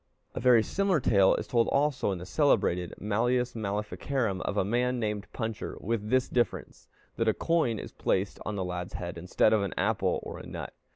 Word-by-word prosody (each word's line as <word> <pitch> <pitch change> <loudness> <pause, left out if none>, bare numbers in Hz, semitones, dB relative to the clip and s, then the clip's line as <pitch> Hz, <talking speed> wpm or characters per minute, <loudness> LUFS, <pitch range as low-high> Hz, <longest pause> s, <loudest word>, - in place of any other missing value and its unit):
A - - -4
very 120 -2 +5
similar 195 - +1
tale 100 -6 +4
is - - -3
told 115 -2 +2
also 140 -6 +1
in 95 - -2
the 90 - -8
celebrated 90 - +1
Malleus 120 +4 0
Maleficarum 105 +1 -2
of 105 - -3
a 95 - +2
man 125 +4 0
named 105 -2 -2
Puncher, 110 -3 -4
with 105 0 -2
this 130 +1 +2
difference, 120 -4 -2 0.3
that 115 - 0
a 110 - +3
coin 160 -10 +1
is - - -7
placed 95 +1 -1
on 105 - -3
the 95 -2 -2
lad's 90 0 -5
head 85 -1 -5
instead 90 +5 +2
of 110 - +3
an 100 -2 -3
apple - - +1
or - - -7
a - - -9
nut. - - -6
110 Hz, 195 wpm, -29 LUFS, 100-125 Hz, 0.3 s, very